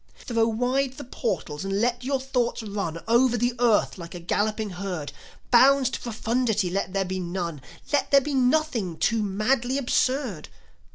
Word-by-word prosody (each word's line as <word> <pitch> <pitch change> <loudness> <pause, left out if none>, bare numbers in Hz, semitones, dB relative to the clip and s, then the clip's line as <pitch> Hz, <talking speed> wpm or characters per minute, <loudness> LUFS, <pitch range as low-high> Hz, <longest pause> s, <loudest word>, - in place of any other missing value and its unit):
Throw 230 -2 0
wide 250 +4 0
the - - -9
portals 195 - -3
and 195 0 -1
let 245 +2 0
your 270 +1 0
thoughts 250 -3 -1
run 200 -6 -4
Over 240 +1 +4
the 245 +1 +1
earth 230 -5 +2
like 170 +1 -8
a - - -6
galloping 210 +4 -1
herd. 180 -6 -5 0.4
Bounds 260 +1 +6
to - - -3
profundity 225 -4 -1
let 190 0 -2
there 195 -1 0
be 185 +1 -3
none, 170 -4 -4 0.3
Let 290 - +2
there 280 - +7
be 290 +2 -4
nothing 255 - +1
too 225 -1 +1
madly 235 +6 0
absurd. 255 - 0
230 Hz, 165 wpm, -25 LUFS, 190-255 Hz, 0.4 s, there